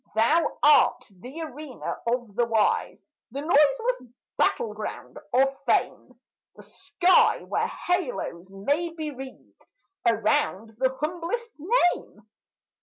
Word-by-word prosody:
Thou 270 +10 +2
art 250 -4 +5
the 250 - -10
arena 300 -3 -6
of 240 -3 -1
the 240 +3 +1
wise, 225 -2 +1 0.3
The 280 - -5
noiseless 295 - +2 0.2
battle 470 - +1
ground - - -7
of 270 +2 +3
fame; - - 0 0.4
The - - -14
sky 365 0 +2
where - - -1
halos 355 - -3
may 285 - -1
be 310 -2 -4
wreathed 265 -1 -12 0.4
Around 225 -2 0
the 260 0 +1
humblest 355 +9 -3
name. 350 - 0
275 Hz, 110 wpm, -26 LUFS, 235-335 Hz, 0.4 s, art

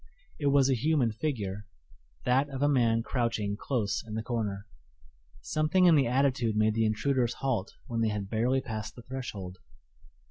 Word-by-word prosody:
It 145 - 0
was 140 -1 +5
a 135 - +3
human 130 -1 +2
figure 105 -6 -3 0.6
that 135 +3 +2
of 135 0 -3
a - - +5
man 115 -5 +3
crouching 115 -5 -1
close 110 -2 -1
in 110 -2 -7
the 110 - -2
corner. 105 -4 -3 0.8
Something 155 - +2
in 175 - +7
the 140 -5 +4
attitude 125 -3 +1
made 110 0 +3
the 110 0 +2
intruders 120 +2 0
halt 120 -8 -2
when 115 -1 -2
they 110 - +2
had 105 -2 -3
barely 120 +5 +1
passed 110 -3 -5
the 120 - -11
threshold. 100 -9 -6
120 Hz, 170 wpm, -29 LUFS, 110-135 Hz, 0.8 s, in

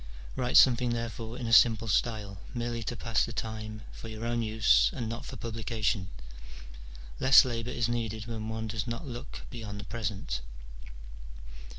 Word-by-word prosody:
Write 125 -1 +2
something 125 -1 +6
therefore 115 0 -4
in 125 - -4
a 115 - 0
simple 115 -1 +6
style, 105 -3 0 0.2
merely 120 -1 -2
to 120 - -3
pass 115 -1 +1
the 115 - -3
time, 110 -1 -5
for - - -9
your 110 +1 -6
own 120 0 0
use, 110 - +4
and 115 - -3
not 115 +1 -5
for - - -7
publication. 110 -4 -2 1.1
Less 130 0 +8
labour 115 -1 -3
is 120 -2 0
needed 110 -2 -2
when 110 -2 -5
one 110 0 -3
does 110 +1 -3
not 120 +7 -4
look 125 0 -8
beyond 105 -4 -6
the - - -6
present." 100 - -3
115 Hz, 165 wpm, -30 LUFS, 110-120 Hz, 1.1 s, Less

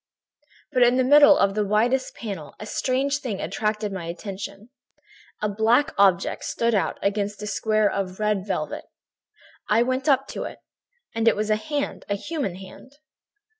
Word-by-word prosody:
"But 255 -3 +1
in 245 +1 +5
the 260 - +3
middle 290 +2 +7
of 195 0 +2
the 210 +1 0
widest 230 +6 +1
panel 195 -10 -7
a 215 - -7
strange 270 +5 0
thing 230 -8 -4
attracted 210 +3 -2
my 185 -3 -5
attention. 200 +4 -7 0.7
A - - +3
black 230 +9 +2
object 195 -2 +2
stood 235 0 0
out 200 - 0
against 205 +1 -1
a - - -3
square 215 0 +1
of 190 -1 -3
red 210 -2 0
velvet. - - -3 0.8
I 225 +3 +4
went 260 +4 -1
up 270 0 +3
to - - -4
it; - - -7 0.6
it 225 0 +3
was 215 +1 -1
a - - +4
hand, 285 +6 -4
a 200 - +1
human 280 - -4
hand. 195 +8 -13
215 Hz, 165 wpm, -24 LUFS, 200-255 Hz, 0.8 s, middle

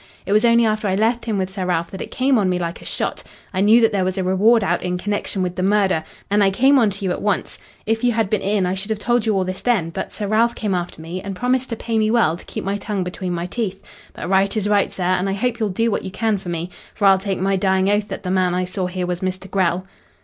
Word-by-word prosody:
It - - -4
was 215 +2 +4
only 235 0 +5
after 215 -1 0
I 190 - +1
left 230 +4 +1
him 220 -3 -1
with 190 -1 -2
Sir 190 -1 -3
Ralph 170 -2 -1
that 190 - -7
it - - -6
came 260 -1 +2
on 195 -3 +1
me 180 - +1
like 170 -1 -4
a - - -12
shot. - - -2 0.3
I 185 - 0
knew 215 +4 +6
that 225 -1 +4
there 195 -3 +1
was 185 +1 -1
a 190 - 0
reward 205 +5 +4
out - - 0
in 180 0 -2
connection 205 0 -2
with 180 -1 -3
the 185 - -2
murder, 190 -4 +2 0.2
and 205 +1 +3
I 195 - +5
came 265 +7 +4
on 225 -4 +4
to 200 0 -5
you 185 - 0
at - - -3
once. 205 -2 -1 0.3
If 225 +1 0
you 245 - +4
had 225 -2 +1
been 210 0 0
in 200 -1 +1
I 180 - 0
should 195 +3 -5
have 220 - 0
told 240 +1 0
you 215 - +2
all 190 - +2
this 185 0 -4
then, 200 -10 +1
but - - -5
Sir 210 - -4
Ralph 230 +3 +2
came 210 -3 -2
after 175 -2 -3
me 175 +3 -5
and 195 -1 -5
promised 250 +4 0
to 230 - -2
pay 230 0 -1
me 215 0 +2
well 220 -9 +3
to 175 - -12
keep - - -5
my 195 +2 -1
tongue 200 -2 -3
between 180 0 -4
my 170 0 -2
teeth. 195 0 -4 0.3
But - - -6
right 195 +3 +2
is 205 -1 0
right, 205 -1 +2
sir, 185 - -4
and 185 +2 +1
I - - 0
hope 235 +4 -1
you'll 215 -2 0
do 225 +5 0
what - - -1
you 190 - -4
can 210 +2 0
for 185 - -8
me. 170 +1 -4 0.2
For 205 - 0
I'll 195 -1 +6
take 195 0 -2
my 195 +1 +1
dying 190 0 +2
oath 205 +1 +1
that - - -6
the 180 - -2
man 185 -1 +2
I 180 0 0
saw 185 0 -3
here 180 0 -3
was 180 0 -3
Mr. 185 0 -4
Grell." 185 -1 +1
195 Hz, 300 wpm, -21 LUFS, 185-220 Hz, 0.3 s, knew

